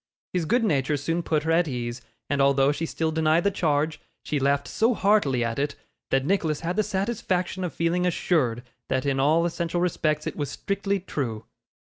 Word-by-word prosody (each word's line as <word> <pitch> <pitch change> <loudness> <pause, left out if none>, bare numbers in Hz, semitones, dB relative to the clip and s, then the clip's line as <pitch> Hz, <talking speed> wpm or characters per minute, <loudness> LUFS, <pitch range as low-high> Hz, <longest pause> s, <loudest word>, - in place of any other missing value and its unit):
His 180 -3 0
good 240 +8 +2
nature 150 -6 +1
soon 165 +5 -1
put 155 -3 0
her 160 - 0
at 170 +1 +3
her - - -3
ease; 120 0 -4 0.3
and 140 0 +1
although 135 0 +4
she 165 +3 -3
still 160 0 -1
denied 160 +1 +2
the 200 - +2
charge, 155 -4 0 0.2
she 150 - -1
laughed 140 +1 +1
so 230 +2 +2
heartily 195 - +2
at 115 +2 -2
it, 145 0 -1 0.3
that 135 0 +1
Nicholas 160 -4 0
had 170 +2 -2
the 215 - +3
satisfaction 190 -3 -1
of 180 - -2
feeling 175 +2 0
assured 130 -9 +1 0.2
that 130 0 -1
in 135 -1 +1
all 155 +5 +3
essential 170 0 -1
respects 155 -3 0
it - - -3
was 145 -2 -3
strictly 200 0 -2
true. 120 - -4
160 Hz, 195 wpm, -25 LUFS, 140-180 Hz, 0.3 s, although